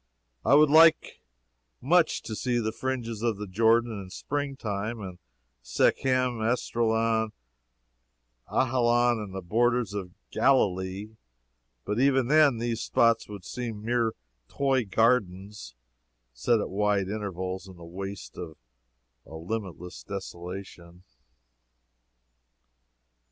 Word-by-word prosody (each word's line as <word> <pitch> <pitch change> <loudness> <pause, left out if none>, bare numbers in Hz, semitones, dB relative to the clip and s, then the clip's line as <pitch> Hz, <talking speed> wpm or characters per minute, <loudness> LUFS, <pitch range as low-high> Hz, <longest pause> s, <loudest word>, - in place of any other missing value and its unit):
I 140 - +5
would 150 0 +6
like 160 +1 +5 0.6
much 165 +5 +2
to 110 - -5
see 125 +2 -1
the 110 -2 -1
fringes 115 -3 -4
of 115 -3 0
the 105 - -5
Jordan 115 +2 +2
in 95 - -10
spring 140 +6 -4
time, 110 0 -4
and 95 -3 -8 0.4
Shechem, 125 - +1
Esdraelon, 115 -1 0 1.2
Ajalon 120 -2 +2
and 100 -3 -7
the 95 - -5
borders 120 +3 +1
of 95 -3 -6 0.2
Galilee 100 -4 +1 0.7
but 105 +3 -1
even 135 -2 +3
then 150 -4 +5
these 115 0 -2
spots 115 -2 +2
would 100 -4 -9
seem 115 -4 -6
mere 115 -1 +1 0.3
toy 135 - 0
gardens 105 - 0 0.6
set 110 - +1
at - - -4
wide 100 -1 +1
intervals 95 -2 -4
in 95 -2 -13
the 85 - -11
waste 95 +3 -7
of 80 -3 -8 0.7
a 80 - -10
limitless 90 0 -6
desolation. 90 -2 -8
110 Hz, 115 wpm, -27 LUFS, 95-120 Hz, 1.2 s, would